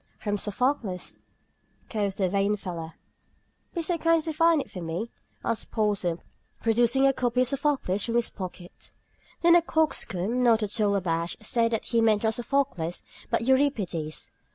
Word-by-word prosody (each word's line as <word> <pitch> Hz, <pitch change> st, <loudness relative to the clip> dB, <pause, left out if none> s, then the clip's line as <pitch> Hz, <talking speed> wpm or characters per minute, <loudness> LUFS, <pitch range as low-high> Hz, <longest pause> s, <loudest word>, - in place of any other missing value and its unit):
"From 205 Hz, -2 st, -2 dB
Sophocles," 210 Hz, -3 st, -2 dB, 0.7 s
quoth 205 Hz, -3 st, -2 dB
the 190 Hz, -, +2 dB
vain 200 Hz, +2 st, +1 dB
fellow. 170 Hz, -4 st, -6 dB, 0.8 s
"Be 340 Hz, -, -1 dB
so 335 Hz, +1 st, -1 dB
kind 330 Hz, +1 st, +4 dB
as 315 Hz, -, -3 dB
to 320 Hz, -, -2 dB
find 330 Hz, +1 st, +4 dB
it -, -, -4 dB
for 185 Hz, -, -7 dB
me?" 170 Hz, +8 st, -4 dB, 0.3 s
asked 230 Hz, -1 st, -1 dB
Porson, 200 Hz, -6 st, 0 dB, 0.4 s
producing 240 Hz, +4 st, +3 dB
a 270 Hz, -, +5 dB
copy 250 Hz, -1 st, +1 dB
of 255 Hz, -, +2 dB
Sophocles 275 Hz, -9 st, 0 dB
from 235 Hz, -, -2 dB
his 240 Hz, -1 st, +1 dB
pocket. 180 Hz, -2 st, -9 dB, 0.5 s
Then 340 Hz, 0 st, +7 dB
the 345 Hz, -, +7 dB
coxcomb, 250 Hz, -, 0 dB
not 230 Hz, -3 st, +4 dB
at 210 Hz, +2 st, +1 dB
all 205 Hz, -1 st, +3 dB
abashed, 170 Hz, +1 st, -2 dB
said 230 Hz, +1 st, +2 dB
that 225 Hz, -, -1 dB
he 230 Hz, -1 st, +2 dB
meant 220 Hz, -2 st, +3 dB
not 220 Hz, 0 st, +2 dB
Sophocles, 240 Hz, -, -1 dB, 0.3 s
but -, -, +1 dB
Euripides. 225 Hz, -, 0 dB
225 Hz, 165 wpm, -27 LUFS, 190-265 Hz, 0.8 s, Then